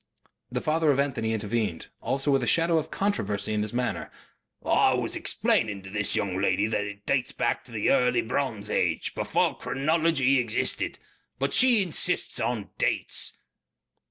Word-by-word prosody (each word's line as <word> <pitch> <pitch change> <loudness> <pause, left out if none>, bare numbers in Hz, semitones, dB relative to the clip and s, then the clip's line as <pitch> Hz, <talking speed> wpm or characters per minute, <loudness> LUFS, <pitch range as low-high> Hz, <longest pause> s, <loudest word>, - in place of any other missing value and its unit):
The - - -2
father 155 0 +1
of 140 -1 +3
Anthony 130 -5 0
intervened, 105 -5 -2
also 140 +2 0
with 135 -1 +3
a 120 - -2
shadow 165 +3 +3
of 155 - -6
controversy 105 - -1
in 105 - 0
his 105 0 -3
manner. 125 +1 -2 0.6
"I - - +4
was - - -2
explaining 100 -4 0
to 95 - -10
the 105 +1 -1
young 95 -2 -1
lady 100 - +2
that 110 -2 -1
it 105 0 -9
dates 130 -3 0
from 120 - 0
the 115 -4 0
early 125 -2 +3
bronze - - -2
age. - - 0
Before - - 0
chronology 140 -2 +1
existed.... 115 -3 0 0.4
But 135 +1 -1
she 245 -5 +5
insists 175 -4 +1
on - - -2
dates." - - -1
125 Hz, 155 wpm, -26 LUFS, 105-150 Hz, 0.6 s, she